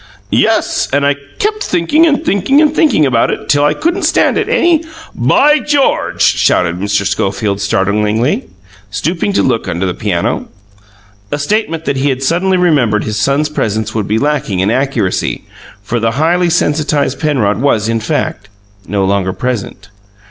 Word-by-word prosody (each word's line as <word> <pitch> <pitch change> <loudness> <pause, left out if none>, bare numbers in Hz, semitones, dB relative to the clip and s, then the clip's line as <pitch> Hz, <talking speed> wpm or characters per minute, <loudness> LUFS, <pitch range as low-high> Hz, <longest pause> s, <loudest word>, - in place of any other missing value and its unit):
"Yes, - - +1
and 140 +1 +1
I 145 0 +2 0.2
kept 425 0 -1
thinking 240 - +2
and 310 +1 0
thinking 200 +8 +2
and 305 -1 +3
thinking 300 - +3
about 120 -4 +2
it - - -4
till 145 0 +2
I 150 +1 +2
couldn't 340 +5 -1
stand - - +2
it 430 0 -1
any 345 -9 +2 0.2
" 320 - -19
"By 300 +1 +3
GEORGE!" 290 -2 0
shouted 90 0 +2
Mr. 100 0 -1
Schofield 100 +1 -1
startlingly, 105 +5 0 0.4
stooping 165 - -2
to - - +2
look 120 -6 0
under 90 +1 -2
the 90 - -1
piano. 90 -3 -2 0.8
A 145 - -1
statement 165 0 -1
that 140 - -1
he 140 +2 +1
had 135 0 -2
suddenly 180 +6 +1
remembered 140 -12 +2
his 110 0 -3
son's 140 +6 +1
presence 110 -7 -2
would 110 -3 -2
be 110 - 0
lacking 140 -8 -1
in 95 +3 +1
accuracy, 130 -7 -1 0.4
for 120 +3 -2
the 115 0 0
highly 175 +3 +2
sensitized 150 -3 0
Penrod 120 -9 0
was, 115 -6 +1
in 115 0 0
fact, 105 -2 -3 0.4
no 100 0 0
longer 95 -1 0
present. 105 -5 -4
135 Hz, 165 wpm, -13 LUFS, 105-175 Hz, 0.8 s, and